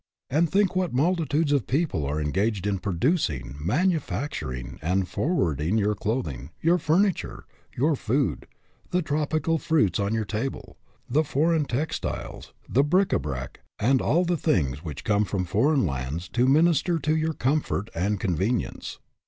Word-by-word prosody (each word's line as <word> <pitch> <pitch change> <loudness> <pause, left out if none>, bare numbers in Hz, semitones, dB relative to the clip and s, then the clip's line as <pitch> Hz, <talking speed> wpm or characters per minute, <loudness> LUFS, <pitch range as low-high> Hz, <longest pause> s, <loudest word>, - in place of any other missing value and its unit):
And 160 +4 +3
think 195 -1 +2
what 180 -7 0
multitudes 160 0 +1
of 140 -9 +1
people 135 - 0
are 75 +2 -1
engaged 95 +6 0
in 100 -2 0
producing, 85 - -1
manufacturing 140 - -1
and 90 +3 0
forwarding 90 - 0
your 105 0 +2
clothing, 80 - -3
your 170 +2 +3
furniture, 175 +5 0 0.3
your 150 +5 +3
food, 120 - -1 0.4
the 180 0 +1
tropical 155 +2 0
fruits 110 - +2
on 100 +2 0
your 110 -1 -1
table, 110 +6 -4 0.3
the 150 +6 +2
foreign 155 +2 +1
tex 140 +5 -2
tiles, - - -6 0.2
the 135 - +3
bric 180 +6 +2
a - - +3
brac, 65 -4 -5 0.2
and 130 +4 +2
all 175 +5 +2
the 175 0 +1
things 75 - 0
which 75 -5 -6
come 105 0 +2
from 95 -3 -2
foreign 130 - +2
lands 70 +4 -3
to 125 +4 +2
minister 165 +4 +3
to 155 +1 0
your 160 0 0
comfort 135 -7 -1
and 100 +4 0
convenience. 95 +6 -2
125 Hz, 155 wpm, -26 LUFS, -, 0.4 s, And